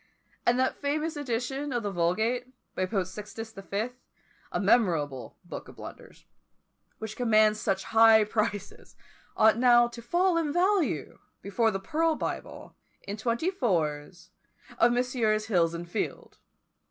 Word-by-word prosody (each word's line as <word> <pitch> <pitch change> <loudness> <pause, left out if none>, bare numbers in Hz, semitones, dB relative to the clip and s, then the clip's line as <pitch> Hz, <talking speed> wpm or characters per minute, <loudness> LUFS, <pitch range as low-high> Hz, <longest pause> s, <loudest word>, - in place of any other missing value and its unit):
And 240 +1 +4
that 260 0 0
famous 305 +3 -1
edition 270 +1 -3
of 240 -3 -1
the 205 - -2
Vulgate, 220 +8 0 0.3
by 185 - -1
Pope 195 -2 -1
Sixtus 210 +4 -8
the 195 - -10
Fifth, 220 +6 -4 0.5
a - - -1
memorable 165 - +1
book 175 - -8
of - - -13
blunders, - - -12 0.7
which 220 -1 -6
commands 215 -3 +3
such 190 0 -1
high 225 -1 +6
prices, 210 -2 -3 0.4
ought 220 +1 +5
now 240 -1 +6
to 235 0 -10
fall 345 +8 +1
in 320 -3 0
value, 350 - 0 0.2
before 205 +4 +1
the 195 -3 -3
pearl 320 +10 0
Bible, - - -6 0.3
in 200 - -5
twenty 235 - -1
fours, 170 - -2 0.5
of 240 - +5
Messrs. 240 -4 +1
Hills 170 -6 +1
and 170 +1 -6
Field! 200 +5 -5
225 Hz, 140 wpm, -28 LUFS, 195-250 Hz, 0.7 s, high